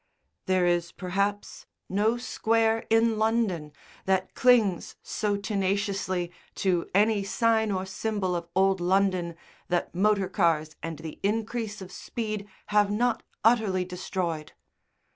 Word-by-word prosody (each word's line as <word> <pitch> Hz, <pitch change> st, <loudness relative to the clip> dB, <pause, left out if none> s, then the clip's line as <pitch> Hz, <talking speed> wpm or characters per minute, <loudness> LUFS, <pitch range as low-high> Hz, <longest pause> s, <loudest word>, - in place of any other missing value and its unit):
There 185 Hz, -1 st, +3 dB
is, 175 Hz, -1 st, +1 dB
perhaps, 200 Hz, +2 st, -2 dB, 0.2 s
no 215 Hz, +5 st, +1 dB
square 225 Hz, -2 st, +1 dB
in 225 Hz, -1 st, +3 dB
London 215 Hz, -9 st, 0 dB, 0.3 s
that 190 Hz, -1 st, 0 dB
clings 225 Hz, -8 st, +3 dB
so 205 Hz, -2 st, -1 dB
tenaciously 195 Hz, -3 st, -1 dB, 0.2 s
to 180 Hz, -3 st, 0 dB
any 210 Hz, 0 st, +3 dB
sign 220 Hz, +2 st, +2 dB
or 190 Hz, -1 st, -1 dB
symbol 190 Hz, -1 st, -2 dB
of 170 Hz, -1 st, -4 dB
old 190 Hz, 0 st, +3 dB
London 185 Hz, -2 st, +1 dB, 0.3 s
that 175 Hz, -1 st, -1 dB
motor 200 Hz, +1 st, +2 dB
cars 160 Hz, -5 st, +1 dB
and 165 Hz, -1 st, -5 dB
the 155 Hz, 0 st, -8 dB
increase 220 Hz, 0 st, -2 dB
of 185 Hz, -, -11 dB
speed 215 Hz, -2 st, -4 dB, 0.2 s
have 210 Hz, -1 st, +4 dB
not 240 Hz, +4 st, +1 dB, 0.2 s
utterly 215 Hz, -5 st, +3 dB
destroyed. 180 Hz, -3 st, -4 dB
195 Hz, 125 wpm, -27 LUFS, 180-220 Hz, 0.3 s, have